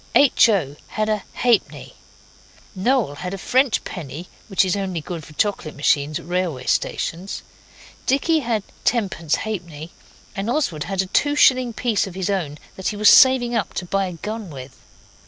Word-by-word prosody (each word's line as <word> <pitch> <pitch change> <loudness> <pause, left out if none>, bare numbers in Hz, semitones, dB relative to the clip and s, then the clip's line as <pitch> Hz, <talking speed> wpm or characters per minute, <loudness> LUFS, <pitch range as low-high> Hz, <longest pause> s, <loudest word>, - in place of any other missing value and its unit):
H. 275 -4 +6
O. 150 -9 0
had 215 0 -2
a 215 -1 0
halfpenny. 240 -4 0 0.8
Noel 210 - +1
had 180 +4 -4
a - - -7
French 255 +4 +1
penny, 160 0 -7 0.2
which 195 -1 +2
is 185 - 0
only 190 -4 -2
good 165 +1 -6
for 155 - -13
chocolate 195 -3 -1
machines 145 +1 +1
at - - -11
railway 175 -7 -2
stations. 180 +4 -2 0.6
Dicky 315 +4 +2
had 230 -6 -1 0.2
tenpence 190 -9 0
halfpenny, 170 -7 -6 0.4
and 195 +2 -3
Oswald 240 - -1
had 190 0 -1
a - - -7
two 290 +10 +1
shilling 255 -4 +4
piece 225 -3 0
of 185 - -9
his 190 +1 -1
own 160 -7 -2 0.2
that 190 - -3
he - - -1
was 210 0 +5
saving 260 -2 +6
up 220 -6 -2
to 180 - -3
buy 195 +2 0
a 180 - -6
gun 210 +4 -6
with. 130 -3 -10
195 Hz, 175 wpm, -22 LUFS, 170-230 Hz, 0.8 s, H